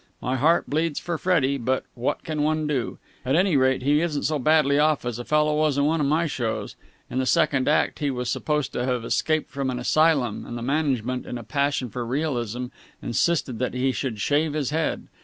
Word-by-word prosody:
My 130 - -2
heart 160 +6 +3
bleeds 155 +1 0
for 170 -2 -4
Freddie, 140 -7 +1
but 130 +2 0
what 125 +1 -2
can 155 -2 -3
one 155 +1 +1
do? 140 -5 -2 0.3
At 130 +2 +1
any 180 -1 +3
rate 130 -1 +2
he 145 +3 +3
isn't 155 -4 -1
so 150 +1 0
badly 145 0 +3
off 150 -3 +2
as 120 -1 -3
a - - -4
fellow 150 +2 +2
was 150 -2 +1
in 140 - +3
one 160 +1 +1
of 140 - +1
my 155 +4 +2
shows. 120 -7 -3 0.4
In 130 - -1
the 130 - 0
second 145 -5 +2
act 150 - +2
he 145 -2 0
was 125 -2 -3
supposed 150 +3 -1
to 120 - -1
have 125 -2 -1
escaped 155 +4 0
from 140 -2 -2
an 125 - -2
asylum, 135 -3 +2
and 120 - -6
the 115 - -5
management, 130 -3 -1
in 125 - -4
a 120 - -8
passion 140 0 -1
for 120 +3 -4
realism, 125 -3 -2 0.3
insisted 130 -1 0
that 125 0 -2
he 130 +1 +1
should 125 -5 -3
shave 145 +7 +1
his 150 -2 -1
head. 160 +1 -1
140 Hz, 215 wpm, -24 LUFS, 125-155 Hz, 0.4 s, heart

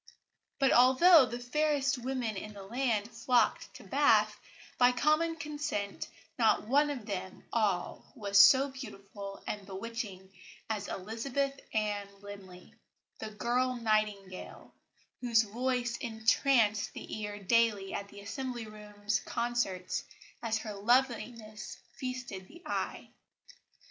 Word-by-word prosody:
But 270 -1 +3
although 260 +4 +7
the 240 0 -5
fairest 275 +1 +1
women 245 -3 -2
in 210 +2 -6
the 200 - -9
land 230 0 -1
flocked 240 +2 +1
to - - -11
Bath, - - +3 0.4
by 250 0 +6
common 310 +5 +2
consent 295 -10 -4 0.3
not 220 -2 +3
one 290 +4 +4
of 260 -7 -4
them 190 -2 -5
all 205 -6 -1
was 200 -4 +5
so 270 +4 +7
beautiful 200 -6 -9
and 210 -1 -4
bewitching 195 -2 -6 0.4
as 210 -2 -2
Elizabeth 265 +8 -2
Ann 210 -2 -1
Linley, 195 -3 -11 0.5
the 220 - -5
girl 245 +4 0
nightingale, 215 -5 -2 0.5
whose 230 -2 +3
voice 240 +2 -1
entranced 220 -1 +2
the - - -6
ear 205 0 -4
daily 205 -1 +2
at 200 - -4
the 200 0 -12
Assembly 240 +2 -5
Rooms 210 -1 -3
concerts 195 -5 -2 0.4
as 225 -1 0
her 220 -1 -6
loveliness 225 -1 0 0.2
feasted 250 -7 -5
the 345 +2 -15
eye. - - -3
225 Hz, 120 wpm, -31 LUFS, 205-255 Hz, 0.5 s, although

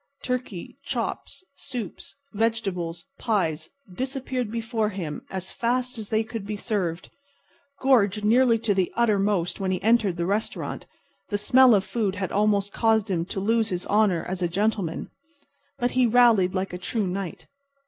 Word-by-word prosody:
Turkey, 250 -8 -4
chops, - - -4
soups, 250 -8 -6 0.2
vegetables, 200 -6 -1
pies, 165 -9 0 0.2
disappeared 260 0 -3
before 225 -1 -1
him 170 -7 -5
as 190 -1 -4
fast 245 +1 -1
as 215 - -7
they 220 0 +2
could 220 -1 -6
be 210 +1 -4
served. 190 -5 -3 0.7
Gorged 210 -6 +3
nearly 235 +1 +5
to 220 -2 +1
the 190 -2 0
uttermost 205 -6 +1
when 195 -1 -1
he 185 - 0
entered 220 -5 +3
the 170 - -1
restaurant, 205 +4 -2 0.4
the 205 - 0
smell 250 +3 +6
of 195 - +2
food 205 -2 -1
had 190 -2 -3
almost 205 -1 +1
caused 220 -2 +2
him 170 -2 0
to 190 - -4
lose 225 +2 +1
his 180 -1 -3
honor 200 -5 +2
as 185 0 -4
a 175 - +2
gentleman, 195 -2 -1 0.7
but 245 -2 0
he 255 -1 +3
rallied 225 -6 +5
like 185 0 -2
a 180 - -4
true 215 +3 -1
knight. 185 -1 -4
210 Hz, 160 wpm, -25 LUFS, 190-230 Hz, 0.7 s, smell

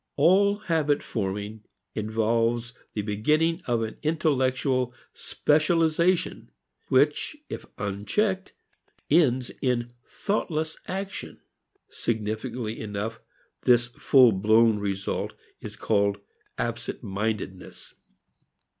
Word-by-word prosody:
All 195 +7 +4
habit 160 -8 +1
forming 105 0 -3 0.3
involves 115 +2 0 0.2
the 105 - -1
beginning 155 - +1
of 120 -2 +1
an 110 -1 -5
intellectual 130 -5 +1 0.2
specialization 165 - +1 0.4
which 145 - +2
if - - -6
unchecked 185 - -1 0.6
ends 130 -6 +3
in 120 -2 0
thoughtless 160 -6 -2
action. 195 +1 -5 0.5
Significantly 110 +1 -3
enough 110 +1 -4 0.4
this 120 0 +4
fullblown 110 -3 +5
result 100 -1 -2 0.3
is - - -8
called 100 -2 +1 0.4
absentmindedness. 100 -2 -4
120 Hz, 80 wpm, -26 LUFS, 110-155 Hz, 0.6 s, fullblown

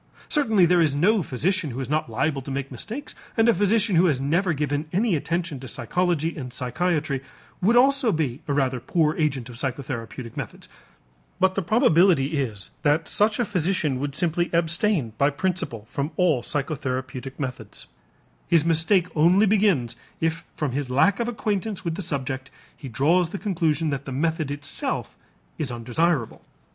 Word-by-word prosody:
Certainly 220 - +4
there 175 0 +4
is 150 -4 +2
no 200 +8 +3
physician 165 - -1
who 125 +1 -5
is 130 - -3
not 155 -3 -1
liable 135 +5 -1
to 135 - -9
make 135 0 -4
mistakes, 275 +7 -5 0.2
and 225 0 +4
a 235 - +6
physician 205 +1 +2
who 175 +3 +5
has 145 -6 +1
never 170 +7 +1
given 145 0 -1
any 200 +1 +2
attention 165 -1 -2
to 130 - -9
psychology 165 +6 -1
and 130 -5 -6
psychiatry 145 +2 -1 0.4
would 215 +6 +3
also 270 -1 +4
be 145 -7 -2
a 145 - 0
rather 130 -3 +1
poor 155 +4 +1
agent 140 -6 0
of 120 -2 -10
psychotherapeutic 125 -3 -5
methods, - - -7 0.7
but 190 0 +3
the 195 - -1
probability 170 - +3
is 105 -7 -5
that 150 +2 +2
such 215 +1 +2
a 240 - +1
physician 175 -8 0
would 140 0 -3
simply 175 0 0
abstain 170 - +1
by 140 - +4
principle 165 - -2
from 140 +2 -2
all 165 -9 +3
psychotherapeutic 130 -2 -4
methods; 125 -6 -5 0.6
his 165 -2 +3
mistake 170 +3 +3
only 175 +7 +5
begins 195 - +2 0.2
if 165 0 -1
from 150 -4 -2
his 135 0 -3
lack 180 - +3
of 235 - 0
acquaintance 215 -4 -2
with 165 - -1
the 180 - -4
subject 135 -5 -3 0.3
he 135 - -9
draws 160 +8 +2
the 200 - -5
conclusion 165 -6 0
that 140 0 -3
the 135 - -6
method 155 +2 -1
itself 145 0 -2 0.4
is 140 -5 -1
undesirable. 120 +3 -1
155 Hz, 170 wpm, -24 LUFS, 135-185 Hz, 0.7 s, a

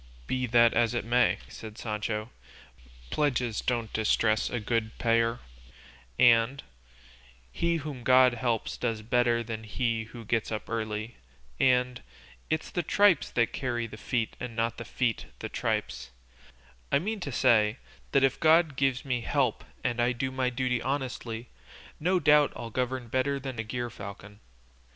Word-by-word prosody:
"Be 130 - -1
that 115 0 +5
as 120 0 +2
it 120 - -2
may," 125 +1 +3
said 110 -1 -10
Sancho, 105 0 -3 0.8
"'pledges 125 -6 0
don't 115 -3 -2
distress 110 0 +2
a 120 - -2
good 110 0 -2
payer,' 115 0 +2 0.8
and 120 +3 +4 0.9
'he 170 0 0
whom 145 -5 -5
God 130 0 +6
helps 115 -1 -1
does 115 -3 -2
better 120 +1 +2
than 110 -1 -6
he 115 +1 -1
who 115 0 -11
gets 115 0 -1
up 110 - -4
early,' 110 0 -4 0.4
and 125 -1 +2 0.5
'it's 155 - -2
the 175 - 0
tripes 200 0 +3
that 115 -1 +1
carry 120 -4 -2
the 110 - -9
feet 115 0 -2
and 125 -2 -6
not 115 0 -1
the 115 - -6
feet 120 -2 -1
the - - -6
tripes;' 60 - -2 0.8
I - - +5
mean 210 +8 -2
to 145 -6 -5
say 115 -3 +3 0.3
that 140 - +3
if 135 -1 +2
God 160 -2 +4
gives 135 -1 0
me 125 -3 -1
help - - 0 0.2
and 120 -1 0
I 120 +1 +2
do 130 +2 -2
my 130 -1 0
duty 125 -1 -1
honestly, 125 -4 -3 0.5
no 180 +4 +2
doubt 150 -2 +5
I'll 115 - -7
govern 125 0 -2
better 130 +4 0
than 130 -3 -6
a - - -1
gerfalcon. 105 -3 -7
120 Hz, 155 wpm, -28 LUFS, 115-130 Hz, 0.9 s, God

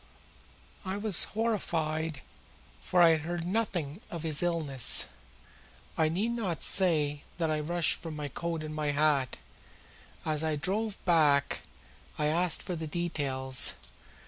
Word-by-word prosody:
I 190 0 -3
was 205 -4 +5
horrified 160 - -2 0.6
for 180 -1 +3
I 170 - +8
had 160 -1 +3
heard 170 +1 -4
nothing 180 -5 -2
of 170 -2 -6
his 155 -3 -1
illness. 160 -7 +2 0.9
I 160 -1 +2
need 200 +8 -1
not 205 -8 -3
say 150 -6 +3 0.2
that 165 -2 0
I 155 - 0
rushed 170 +1 +1
for 165 - -6
my 150 -2 -4
coat 165 +3 -4
and 155 0 -6
my 155 -1 -2
hat. 145 -3 +2 0.9
As 155 -1 0
we 155 -1 0
drove 205 +7 -2
back 150 -5 +3 0.6
I 150 - 0
asked 170 +3 +1
for 180 - -4
the 160 -1 -5
details. 140 -6 0
160 Hz, 140 wpm, -30 LUFS, 150-175 Hz, 0.9 s, I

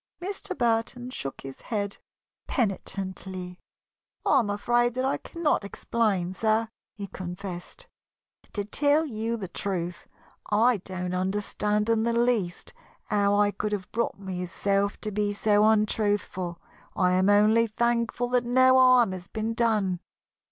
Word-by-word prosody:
Mr. 385 +1 -4
Burton 240 +1 0
shook 135 - -4
his 135 -1 -9
head 200 -3 -3 0.5
penitently. 190 -4 -3 0.7
"I - - +5
am 215 - -1
afraid 240 +4 +1
that 255 +1 0
I 270 - +1
cannot 335 -9 -1
explain, 200 -3 -1
sir," 220 +2 +1 0.3
he 205 - -5
confessed. 185 - -7 0.7
"To 205 -1 -2
tell 290 +8 +2
you 230 -3 -2
the 195 -4 -5
truth, 175 -1 -3 0.4
I 225 +3 +4
do 185 -1 -5
not 180 0 -1
understand 210 +2 -1
in 225 -1 +2
the 235 +1 +1
least 235 - 0 0.4
how 205 0 +2
I 205 0 +3
could 210 +1 -3
have 190 -3 -4
brought 235 +1 -1
myself 195 +1 -1
to 215 - -2
be 205 0 0
so 210 0 +3
untruthful. 205 -5 0 0.4
I 180 -1 +3
am 185 +2 +3
only 215 +3 +5
thankful 235 +2 0
that 250 0 +2
no 260 +2 +5
harm 255 -5 +6
has 180 -1 -7
been 220 +1 -3
done." 215 -6 +1
210 Hz, 140 wpm, -27 LUFS, 190-235 Hz, 0.7 s, harm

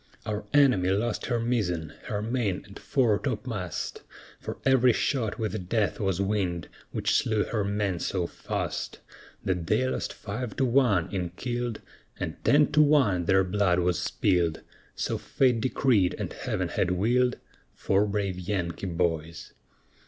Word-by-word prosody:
Our 105 -1 -3
enemy 130 -11 +4
lost 105 +4 0
her 120 -2 0
mizzen, 90 -10 -1
her 105 0 -3
main 115 -5 -1
and 100 0 -12
fore 120 -7 +2
topmast, 110 - -4 0.4
For - - -6
ev'ry 130 -2 +5
shot 115 -3 0
with 105 -5 -3
death 110 -3 +1
was 95 -3 0
winged, 95 -4 -1 0.2
which - - 0
slew 110 -2 +2
her 110 -3 -1
men 100 -3 -1
so 90 0 -1
fast, - - -4 0.5
That 90 -3 -1
they 130 +7 +2
lost - - -2
five 110 +2 -5
to 135 - +1
one 115 -9 +3
in 90 -3 -1
killed, 120 +4 -3 0.4
And - - -5
ten 145 +1 +4
to 150 - +5
one 135 - +4
their 95 +2 +4
blood 95 -1 +2
was 90 -2 +1
spilled, 85 -4 +1 0.3
So - - -2
Fate 125 -4 +2
decreed 115 -6 +2
and - - -4
Heaven - - -2
had - - 0
willed, 120 +7 +2 0.4
For 100 +1 +2
brave 100 -3 -2
Yankee 90 -1 -3
boys. 85 -2 -2
105 Hz, 150 wpm, -27 LUFS, 90-120 Hz, 0.5 s, ev'ry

